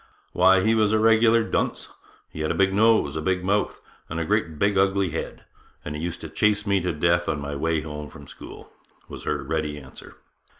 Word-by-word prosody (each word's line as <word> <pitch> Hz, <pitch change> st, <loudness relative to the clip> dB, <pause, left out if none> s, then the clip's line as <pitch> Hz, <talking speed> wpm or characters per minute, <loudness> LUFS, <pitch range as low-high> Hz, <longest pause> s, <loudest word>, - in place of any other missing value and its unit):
'Why, 95 Hz, +1 st, +4 dB
he 110 Hz, -, +3 dB
was 110 Hz, -1 st, +2 dB
a -, -, +4 dB
regular 115 Hz, +1 st, +4 dB
dunce; -, -, -2 dB, 0.4 s
he -, -, -9 dB
had 80 Hz, 0 st, -1 dB
a -, -, -1 dB
big 95 Hz, 0 st, +2 dB
nose, 110 Hz, -8 st, +3 dB
a 80 Hz, -, -2 dB
big 90 Hz, +2 st, -1 dB
mouth, 100 Hz, +2 st, 0 dB, 0.3 s
and 80 Hz, -, -4 dB
a 85 Hz, -, -2 dB
great 100 Hz, -5 st, -1 dB
big 100 Hz, +4 st, +1 dB
ugly 95 Hz, -2 st, +2 dB
head; 80 Hz, -, -6 dB, 0.4 s
and 75 Hz, -, -5 dB
he 75 Hz, -, -5 dB
used 85 Hz, +1 st, -5 dB
to -, -, -6 dB
chase 105 Hz, +5 st, +1 dB
me 100 Hz, -2 st, +1 dB
to 90 Hz, +1 st, -1 dB
death 85 Hz, +2 st, +1 dB
on 75 Hz, -, -1 dB
my 70 Hz, 0 st, -5 dB
way 80 Hz, +2 st, 0 dB
home 75 Hz, -1 st, -7 dB
from 70 Hz, -, -13 dB
school,' -, -, -12 dB, 0.4 s
was -, -, -10 dB
her -, -, -2 dB
ready 75 Hz, -2 st, -3 dB
answer. 65 Hz, -2 st, -12 dB
90 Hz, 215 wpm, -24 LUFS, 80-100 Hz, 0.4 s, Why